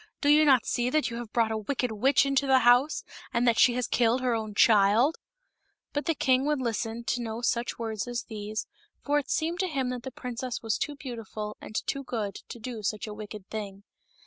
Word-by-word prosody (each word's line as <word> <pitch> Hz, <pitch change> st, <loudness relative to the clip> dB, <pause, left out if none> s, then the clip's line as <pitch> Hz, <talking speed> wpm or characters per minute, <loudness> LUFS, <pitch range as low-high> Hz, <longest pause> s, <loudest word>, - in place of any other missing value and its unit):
Do 285 Hz, -, +1 dB
you 305 Hz, +1 st, +6 dB
not 265 Hz, -5 st, +5 dB
see 240 Hz, 0 st, 0 dB
that 300 Hz, -2 st, +1 dB
you 235 Hz, -, -5 dB
have 235 Hz, -2 st, -7 dB
brought 230 Hz, -2 st, +2 dB
a 220 Hz, -, -1 dB
wicked 250 Hz, +2 st, -2 dB
witch 255 Hz, +7 st, +3 dB
into 275 Hz, 0 st, +1 dB
the 265 Hz, 0 st, +6 dB
house, 245 Hz, +5 st, +4 dB, 0.3 s
and 240 Hz, +1 st, +1 dB
that 230 Hz, -2 st, +3 dB
she 245 Hz, -, +6 dB
has 250 Hz, -1 st, 0 dB
killed 240 Hz, +1 st, +2 dB
her 250 Hz, -2 st, +1 dB
own 215 Hz, -2 st, -3 dB
child 220 Hz, +8 st, +4 dB, 0.4 s
?" -, -, -48 dB
But 290 Hz, -, -2 dB
the 330 Hz, -, +2 dB
king 260 Hz, -1 st, +2 dB
would 300 Hz, -2 st, +1 dB
listen 230 Hz, -1 st, -2 dB
to 245 Hz, +1 st, -1 dB
no 225 Hz, 0 st, -4 dB
such 240 Hz, 0 st, 0 dB
words 220 Hz, -1 st, -3 dB
as 245 Hz, 0 st, -3 dB
these, 215 Hz, -1 st, -5 dB, 0.4 s
for 290 Hz, 0 st, +3 dB
it 285 Hz, -, -8 dB
seemed 335 Hz, +3 st, -1 dB
to 375 Hz, -, +1 dB
him 270 Hz, -6 st, -1 dB
that 250 Hz, -1 st, -4 dB
the 265 Hz, -, -6 dB
princess 250 Hz, -1 st, -5 dB
was 225 Hz, -2 st, -1 dB
too 295 Hz, -, -2 dB
beautiful 225 Hz, -6 st, -6 dB
and 215 Hz, -, -10 dB
too 275 Hz, -, -2 dB
good 215 Hz, -6 st, -3 dB, 0.2 s
to -, -, -7 dB
do 230 Hz, -1 st, -6 dB
such 210 Hz, 0 st, -2 dB
a 215 Hz, -, -6 dB
wicked 210 Hz, -1 st, -9 dB
thing. 200 Hz, -2 st, -6 dB
240 Hz, 225 wpm, -28 LUFS, 220-265 Hz, 0.4 s, you